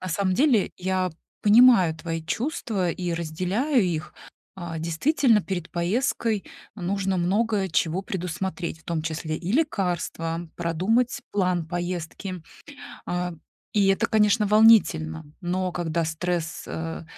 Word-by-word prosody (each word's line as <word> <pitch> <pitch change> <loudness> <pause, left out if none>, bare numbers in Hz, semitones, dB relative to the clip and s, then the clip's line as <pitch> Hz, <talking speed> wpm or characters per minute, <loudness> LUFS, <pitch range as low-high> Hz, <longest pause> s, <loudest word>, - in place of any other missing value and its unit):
На 185 - -5
самом 185 +1 0
деле, 255 -6 +3
я 185 0 -1 0.3
понимаю 210 -6 +6
твои 165 -1 -4
чувства 215 - -2
и 175 0 -3
разделяю 185 - 0
их. 165 -3 -3 0.4
А, 170 -3 -6
действительно, 215 - +2
перед 180 -2 -4
поездкой 210 +3 0 0.3
нужно 195 0 -1
много 200 +2 +1
чего 170 +3 0
предусмотреть, 180 -2 -4
в - - -26
том 165 -2 -2
числе 160 0 -3
и 180 +4 -4
лекарства, 175 - -1
продумать 205 +11 0
план 180 -4 0
поездки. 175 +1 -4 0.6
А, 180 0 -2 0.4
и 200 -2 +3
это, 195 - +2
конечно, 210 0 +3
волнительно, 180 -8 +4 0.2
но 180 +1 -1
когда 170 -1 -1
стресс, 170 +1 -3
э, 165 0 -5
180 Hz, 120 wpm, -25 LUFS, 170-205 Hz, 0.6 s, понимаю